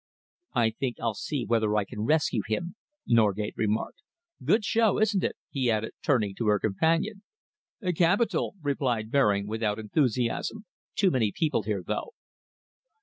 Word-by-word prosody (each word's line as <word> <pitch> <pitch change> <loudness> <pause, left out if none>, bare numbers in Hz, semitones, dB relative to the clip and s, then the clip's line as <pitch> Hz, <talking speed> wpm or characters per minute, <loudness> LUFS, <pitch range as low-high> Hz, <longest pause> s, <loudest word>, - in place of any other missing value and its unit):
"I 115 -2 +3
think 120 +1 -3
I'll 115 -1 0
see 125 +4 -3
whether 110 -2 +1
I 105 - +2
can 105 0 -5
rescue 150 -6 +2
him," 170 +11 -2 0.3
Norgate 105 -3 +2
remarked. 110 - -1 0.4
"Good 215 -1 +3
show, 225 -2 +3
isn't 210 -3 +2
it?" - - -1 0.2
he 130 -4 0
added, 110 0 0
turning 110 -8 +2
to 115 - -1
her 105 0 +4
companion. 165 - 0 0.7
"Capital," 190 +6 +2
replied 125 -6 -1
Baring, 105 -8 +3
without 110 0 -1
enthusiasm. 125 - -1 0.3
"Too 195 -3 +3
many 115 -7 +1
people 155 -2 0
here, 105 -3 -2
though." 460 - -3
115 Hz, 145 wpm, -27 LUFS, 105-160 Hz, 0.7 s, her